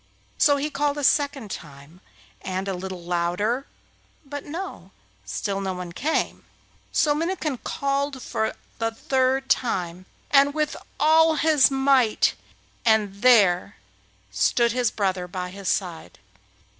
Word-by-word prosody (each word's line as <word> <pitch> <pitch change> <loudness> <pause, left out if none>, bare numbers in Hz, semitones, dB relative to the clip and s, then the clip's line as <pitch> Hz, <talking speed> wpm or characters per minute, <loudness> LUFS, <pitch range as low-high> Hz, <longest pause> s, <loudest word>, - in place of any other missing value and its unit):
So 285 -2 +5
he 295 +2 -2
called 290 0 0
a 290 - -3
second 275 -6 +1
time, 150 +3 -10 0.4
and 190 +1 -3
a 195 - -1
little 185 -1 -6
louder, 180 +9 -1 0.6
but 285 +1 -6
no! 350 +6 -7 0.4
still 195 -2 -2
no 190 -1 -3
one 180 -1 -6
came. 300 - -1 0.5
So 295 - +3
Minnikin 315 -4 -2
called 280 0 -1
for 220 -3 -2 0.2
the 225 0 +1
third 265 +1 0
time, 185 -8 -1 0.2
and 280 +1 +5
with 305 -1 0 0.2
all 320 +2 +5
his 305 -3 +4
might, 270 -4 +3 0.5
and 210 -3 +2
there 200 -6 +4 0.6
stood 165 - +2
his 245 -1 +1
brother 185 -3 -1
by 180 0 -5
his 195 0 -4
side. 170 - -3
235 Hz, 130 wpm, -24 LUFS, 185-285 Hz, 0.6 s, So